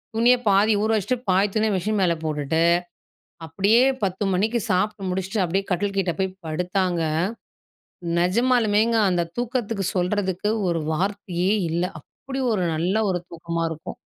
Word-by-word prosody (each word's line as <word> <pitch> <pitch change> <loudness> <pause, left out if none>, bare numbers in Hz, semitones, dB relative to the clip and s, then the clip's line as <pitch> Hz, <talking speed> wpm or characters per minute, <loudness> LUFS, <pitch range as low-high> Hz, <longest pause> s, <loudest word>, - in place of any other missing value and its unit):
துணிய 240 +2 +5
பாதி 205 +3 +4
ஊற 220 - 0
வச்சுட்டு 210 +6 -1
பாதி 195 +3 +3
துணிய 215 0 +2
மிஷின் 205 +3 -1
மேல 170 -2 +2
போட்டுட்டு, 155 +1 0 0.8
அப்படியே 200 +9 +3 0.2
10 190 +2 -2
மணிக்கு 220 +5 +1
சாப்ட்டு 195 +1 0
முடிச்சுட்டு, 190 +2 -1
அப்படியே 195 +3 -1
கட்டில் 200 +2 -1
கிட்டே 180 -3 0
போய் 190 0 0 0.2
படுத்தாங்க, 180 +1 -1 1.2
நெஜமாலுமேங்க 225 +2 +2
அந்த 175 -2 0
தூக்கத்துக்கு 230 -5 -2
சொல்றதுக்கு 190 +2 0 0.2
ஒரு 165 -2 0
வார்த்தையே 190 0 -1 0.2
இல்ல, 170 +2 0 0.2
அப்படி 270 - -7
ஒரு 185 -4 0
நல்ல 175 +5 0 0.2
ஒரு 180 -1 -2
தூக்கமா 170 0 -3
இருக்கும். 160 0 -7
190 Hz, 135 wpm, -23 LUFS, 175-215 Hz, 1.2 s, துணிய